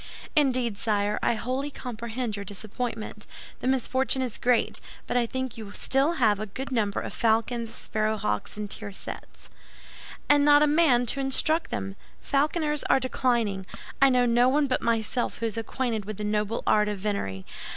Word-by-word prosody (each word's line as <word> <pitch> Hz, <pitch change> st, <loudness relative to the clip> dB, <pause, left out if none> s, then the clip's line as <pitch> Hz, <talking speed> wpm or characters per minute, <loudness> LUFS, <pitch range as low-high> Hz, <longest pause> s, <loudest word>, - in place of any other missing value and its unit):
"Indeed, 255 Hz, -7 st, +2 dB
sire, 210 Hz, -1 st, 0 dB
I -, -, +2 dB
wholly 255 Hz, +5 st, -2 dB
comprehend 235 Hz, -3 st, -4 dB
your 200 Hz, -, -5 dB
disappointment. 215 Hz, +3 st, -5 dB, 0.3 s
The -, -, -3 dB
misfortune 260 Hz, 0 st, +2 dB
is 245 Hz, -4 st, -4 dB
great; 245 Hz, -2 st, +2 dB, 0.2 s
but -, -, -3 dB
I 240 Hz, -1 st, +3 dB
think 260 Hz, -2 st, -4 dB
you 220 Hz, -, -6 dB
have 200 Hz, -, -10 dB
still 275 Hz, +6 st, +2 dB
a 215 Hz, -3 st, +3 dB
good 265 Hz, +7 st, -6 dB
number 210 Hz, -5 st, 0 dB
of -, -, -6 dB
falcons, 230 Hz, +1 st, +1 dB
sparrow 215 Hz, -1 st, -1 dB
hawks, 210 Hz, 0 st, -2 dB
and 210 Hz, 0 st, -3 dB
tiercels." 205 Hz, -1 st, -6 dB, 0.8 s
"And 290 Hz, 0 st, +5 dB
not 290 Hz, 0 st, +6 dB
a -, -, +6 dB
man 295 Hz, -5 st, +4 dB
to 275 Hz, -, +1 dB
instruct 290 Hz, +4 st, +1 dB
them. 95 Hz, -1 st, -4 dB, 0.2 s
Falconers 300 Hz, +1 st, 0 dB
are -, -, +4 dB
declining. 235 Hz, -7 st, 0 dB, 0.3 s
I 275 Hz, -, +7 dB
know 250 Hz, -1 st, +3 dB
no 240 Hz, +1 st, +4 dB
one 290 Hz, +2 st, +3 dB
but 255 Hz, -2 st, 0 dB
myself 230 Hz, +1 st, 0 dB
who 230 Hz, -, -3 dB
is 225 Hz, -, -2 dB
acquainted 225 Hz, -1 st, -2 dB
with 215 Hz, -1 st, -6 dB
the 210 Hz, -, -4 dB
noble 210 Hz, +1 st, -1 dB
art 210 Hz, 0 st, +4 dB
of 210 Hz, -1 st, -2 dB
venery. 185 Hz, -, -3 dB
235 Hz, 170 wpm, -27 LUFS, 210-260 Hz, 0.8 s, I